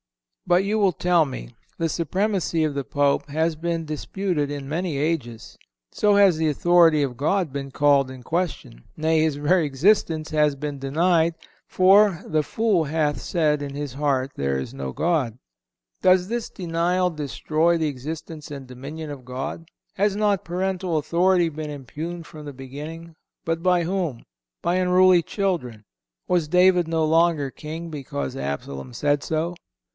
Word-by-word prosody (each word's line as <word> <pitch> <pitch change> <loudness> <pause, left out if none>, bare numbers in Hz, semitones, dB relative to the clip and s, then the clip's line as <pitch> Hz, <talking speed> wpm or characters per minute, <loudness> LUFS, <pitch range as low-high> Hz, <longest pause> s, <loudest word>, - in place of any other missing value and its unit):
But 175 +1 +4
you 215 +2 0
will 195 -3 +4
tell 175 -1 +3
me: - - -8 0.2
"The 165 - 0
supremacy 175 +1 0
of 155 -2 0
the 140 0 -2
Pope 140 +2 0
has 160 +2 0
been 165 +1 -2
disputed 155 0 -2
in 145 -2 -5
many 160 0 -2
ages." 140 -7 -3 0.3
So 205 -1 +3
has 200 -4 +6
the 160 0 +1
authority 165 0 +4
of 130 -3 -3
God 155 +3 0
been 140 -1 -4
called 140 -1 +3
in 130 -1 -10
question—nay, 160 - -2
His 155 -2 +1
very 155 +4 +2
existence 155 +2 +1
has 150 -2 +2
been 145 0 -5
denied; 165 +4 +2 0.3
for, 190 -1 +4
"the 155 -1 +1
fool 205 -3 +1
hath 150 0 0
said 150 -4 +1
in 140 -1 -5
his 145 -3 -4
heart 135 -2 0
there 70 -1 -1
is 65 - -6
no 65 -1 -5
God."(171) 145 - 0 0.6
Does 185 0 +4
this 235 +1 -3
denial 180 +1 0
destroy 155 +2 0
the 160 -1 0
existence 150 +3 -6
and 140 -3 -8
dominion 145 +5 -7
of 140 -3 -8
God? 135 +6 -6 0.2
Has 200 +1 +1
not 205 -2 +1
parental 185 -1 -1
authority 175 +3 +2
been 155 -1 -5
impugned 155 +5 -6
from 155 -1 -11
the 145 - -7
beginning? 150 +5 -9 0.3
But 165 0 -1
by 180 -1 +3
whom? 170 -8 -2 0.4
By 175 - +1
unruly 185 -1 +5
children. 160 - -3 0.4
Was 175 -4 +1
David 180 +1 +4
no 160 -1 +1
longer 160 -3 +2
king 160 +4 -7
because 115 - -5
Absalom 70 -2 -5
said 145 - 0
so? 160 +2 -1
160 Hz, 155 wpm, -23 LUFS, 140-175 Hz, 0.6 s, has